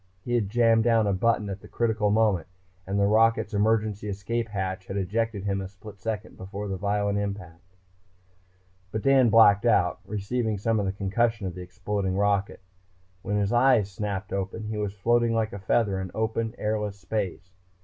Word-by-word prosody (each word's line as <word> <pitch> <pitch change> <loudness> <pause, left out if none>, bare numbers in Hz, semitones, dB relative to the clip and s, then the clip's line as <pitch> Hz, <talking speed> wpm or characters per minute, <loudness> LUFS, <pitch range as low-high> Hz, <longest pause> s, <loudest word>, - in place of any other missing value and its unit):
He 120 - -2
had 110 -5 +1
jammed 115 0 +4
down 115 -2 +3
a 100 - +1
button, 105 +1 +1
at 100 0 -6
the - - -12
critical 110 -3 0
moment, 105 -5 +2 0.4
and 100 +1 -1
the 100 - +4
rocket's 110 +1 +3
emergency 105 0 +1
escape 115 +4 -2
hatch 95 -2 -4
had 95 - -4
ejected 105 +2 -1
him 100 -1 -1
a 95 - -5
split 100 +1 -13
second 110 +2 -5
before 100 +2 -6
the 95 - -3
violent 100 +1 0
impact. 90 -3 -6 1.2
But 110 - -3
Dan 135 -3 +5
blacked 105 -2 +6
out, 90 -7 +3
receiving 105 +2 -2
some 110 +2 0
of 100 - -1
the - - 0
concussion 105 +3 0
of 90 - -3
the 90 - -8
exploding 95 +1 -3
rocket. 100 -1 0 0.6
When 105 +3 -1
his 100 +2 0
eyes 120 -5 +4
snapped 100 0 -4
open 100 +3 -3
he 110 0 -4
was 105 -2 -2
floating 120 +3 +2
like 110 0 0
a 100 - -5
feather 95 0 +1
in 95 - -5
open, 110 +1 -1
airless 105 -1 -2
space. 95 -1 -4
105 Hz, 180 wpm, -26 LUFS, 95-110 Hz, 1.2 s, blacked